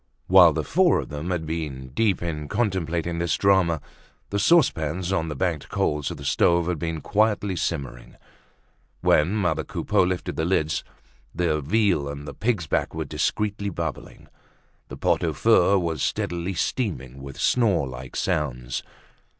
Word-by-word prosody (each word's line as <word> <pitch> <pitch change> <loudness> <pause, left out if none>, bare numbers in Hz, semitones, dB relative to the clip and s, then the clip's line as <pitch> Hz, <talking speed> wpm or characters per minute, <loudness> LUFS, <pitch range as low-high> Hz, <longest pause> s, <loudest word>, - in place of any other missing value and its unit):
While - - +7
the - - -1
four - - +3
of - - -6
them 75 +4 -5
had 85 -3 -2
been 75 -5 -4
deep 95 - 0
in 75 -3 -4
contemplating 85 -6 -1
this 85 0 0
drama, 95 -6 +3 0.5
the 100 - 0
saucepans 95 - +2
on 80 -4 0
the 75 - -4
banked 80 -1 -2
coals 75 -1 0
of - - -6
the 70 - -9
stoves 85 +4 +3
had 90 -3 -1
been 80 -1 -3
quietly 105 -1 +1
simmering. 70 -8 -4 0.9
When 80 +7 +3
mother 100 -4 0
Coupeau - - 0
lifted 90 0 -1
the - - 0
lids, 80 -3 0 0.5
the 80 -3 0
veal 90 -3 +1
and 70 +1 -7
the 70 - -6
pig's 110 -7 -1
back - - -1
were - - -3
discreetly 105 -1 -1
bubbling. 85 -5 -6 0.6
The - - -9
pot - - +1
au - - 0
feu 100 - +4
was 85 -3 -2
steadily 85 +3 -2
steaming 80 - -2
with 70 0 -9
snore 100 - +2
like 65 0 -9
sounds. 60 -5 -2
85 Hz, 160 wpm, -24 LUFS, 75-95 Hz, 0.9 s, While